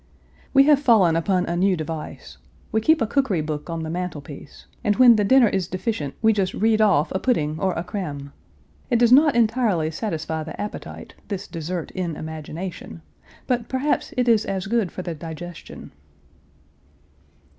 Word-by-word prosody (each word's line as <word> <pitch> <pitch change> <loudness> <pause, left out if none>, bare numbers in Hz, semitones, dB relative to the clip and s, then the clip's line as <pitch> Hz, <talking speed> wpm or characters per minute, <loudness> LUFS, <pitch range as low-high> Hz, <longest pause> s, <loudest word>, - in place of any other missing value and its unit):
We 275 0 +6
have 290 0 +5
fallen 215 - +4
upon 180 +2 +1
a 170 - -2
new 185 +1 +2
device. 155 0 -7 0.3
We 220 - +1
keep 315 +1 +3
a - - +1
cookery 220 - 0
book 150 +1 -5
on 165 -1 -3
the 160 - -5
mantelpiece, 155 -5 -7 0.2
and 210 -3 +2
when 245 -1 +7
the 210 - +2
dinner 255 +3 +5
is 190 -3 -1
deficient 185 - -3
we 220 0 +5
just 195 -2 -1
read 220 0 +2
off 185 -8 +3
a 190 - -1
pudding 155 -12 0
or 190 +1 0
a 170 - -3
creme. 150 -7 -6 0.6
It 240 - +3
does 235 0 +3
not 290 +2 +6
entirely 220 -9 +1
satisfy 160 -4 -3
the 155 +1 -8
appetite, 210 - -7
this 200 -2 -4
dessert 165 +1 -5
in 175 -4 -3
imagination, 160 - -7 0.4
but 240 -2 -1
perhaps 265 +3 -1
it 250 -1 +1
is 225 -2 +4
as 190 -1 -3
good 215 -3 0
for 185 - -6
the 175 - -4
digestion." 165 +2 -9
185 Hz, 170 wpm, -23 LUFS, 160-230 Hz, 0.6 s, when